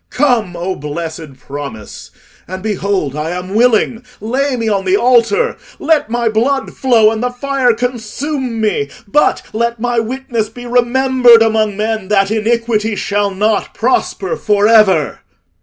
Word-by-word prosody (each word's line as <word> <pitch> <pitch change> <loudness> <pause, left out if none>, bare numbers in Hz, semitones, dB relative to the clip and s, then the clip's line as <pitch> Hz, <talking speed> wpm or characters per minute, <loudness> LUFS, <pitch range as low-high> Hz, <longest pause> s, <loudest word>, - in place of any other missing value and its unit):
Come, 240 -10 0
O 180 +2 -3
blessed 155 -1 -6
promise; 140 -6 -8 0.4
and 185 +1 -7
behold, 200 -8 -2
I 150 +1 -3
am 185 +2 -7
willing—lay 245 +3 0
me 230 -2 -3
on 200 -3 0
the 190 +1 +2
altar: 255 - +2 0.2
let 305 -6 +1
my 235 0 -1
blood 255 +5 0
flow 230 -5 +3
and 220 0 -3
the 250 - 0
fire 260 0 0
consume 245 +2 -3
me; 205 -10 0 0.2
but 295 +9 +2
let 235 +1 -1
my 240 0 0
witness 230 -2 -3
be 245 +2 -11
remembered 245 -1 +4
among 215 -2 0
men, 215 -2 -2
that 195 0 +2
iniquity 225 -1 0
shall 205 0 -1
not 205 +2 -1
prosper 255 - -1
for 210 - +1
ever." 210 -8 +3
225 Hz, 140 wpm, -15 LUFS, 200-245 Hz, 0.4 s, remembered